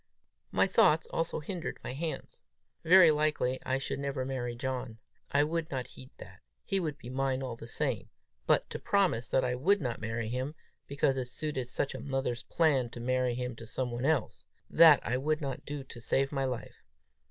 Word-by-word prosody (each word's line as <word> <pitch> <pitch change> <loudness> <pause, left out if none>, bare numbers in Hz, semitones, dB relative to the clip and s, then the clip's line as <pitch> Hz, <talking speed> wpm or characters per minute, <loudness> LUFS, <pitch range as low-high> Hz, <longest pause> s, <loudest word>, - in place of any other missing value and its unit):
My - - +4
thoughts 155 +1 +4
also 165 0 -1
hindered 170 +2 -4
my - - -4
hands. 155 +3 -5 0.4
Very 175 0 +8
likely 150 -4 +1
I 130 - 0
should 135 - -3
never 140 -2 -2
marry 125 -2 -3
John; 125 -2 -4 0.3
I 145 +1 +4
would 165 +1 -2
not 130 -4 -3
heed 130 - -13
that; - - -12 0.2
he 195 - +1
would 155 -5 -3
be 125 -3 -9
mine 135 0 0
all 125 -3 -4
the 115 - -10
same! - - -2 0.4
but - - +3
to - - -4
promise 175 - +1
that 130 - +2
I 125 - 0
would 185 +11 +3
not 120 -8 -3
marry 115 0 -2
him, 130 +5 -3 0.3
because 140 -1 +1
it 130 -1 -2
suited 135 -2 -3
such 135 +2 -2
a - - -6
mother's 135 -3 -2
plans 135 -8 +1
to - - -7
marry 125 0 0
him 125 -1 -3
to 115 - -10
some 125 0 -3
one 120 +2 -3
else 150 -5 0 0.3
that 160 -3 +8
I 125 - 0
would 155 +3 0
not 135 -4 -5
do 145 -1 -4
to 125 -2 -11
save 135 +3 +1
my 135 -2 0
life! 125 -3 -5
135 Hz, 200 wpm, -31 LUFS, 125-150 Hz, 0.4 s, Very